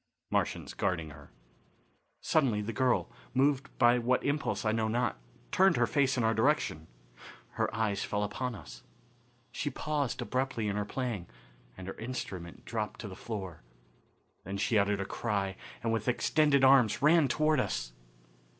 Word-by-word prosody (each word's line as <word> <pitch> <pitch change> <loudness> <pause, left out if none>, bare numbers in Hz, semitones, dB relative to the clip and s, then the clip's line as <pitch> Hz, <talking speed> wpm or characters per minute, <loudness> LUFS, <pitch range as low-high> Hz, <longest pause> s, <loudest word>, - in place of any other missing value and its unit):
Martians - - -1
Guarding 85 -6 -1
Her. 70 -1 -13 0.9
Suddenly 130 -10 +2
the 115 +2 -4
girl, 125 -8 +1 0.2
moved 140 0 +2
by 120 0 +5
what 125 +2 +1
impulse 140 -5 -1
I 110 - +3
know 110 0 0
not, 120 +2 0 0.3
turned 190 -2 +4
her - - +4
face 135 -3 +1
in 120 - +1
our 110 0 +3
direction. 110 - +1 0.6
Her - - -1
eyes 105 -2 -1
fell 105 0 -1
upon 120 +4 -3
us. - - -11 0.7
She 145 - -2
paused 145 -3 -2
abruptly 130 -4 -1
in 100 - -1
her 105 0 -1
playing, 110 -6 -3 0.5
and 95 - -8
her 95 - -4
instrument 100 -8 -6
dropped 105 -2 -3
to 110 - -6
the 95 - -8
floor. 95 -6 -6 0.8
Then 95 +2 -5
she 110 +3 0
uttered 100 0 +1
a - - -2
cry, 100 -3 -2 0.3
and 115 -1 +1
with 110 0 -2
extended 140 +2 +3
arms 130 -3 +5
ran 155 0 +6
toward 155 +3 +2
us. - - -2
115 Hz, 160 wpm, -31 LUFS, 100-135 Hz, 0.9 s, ran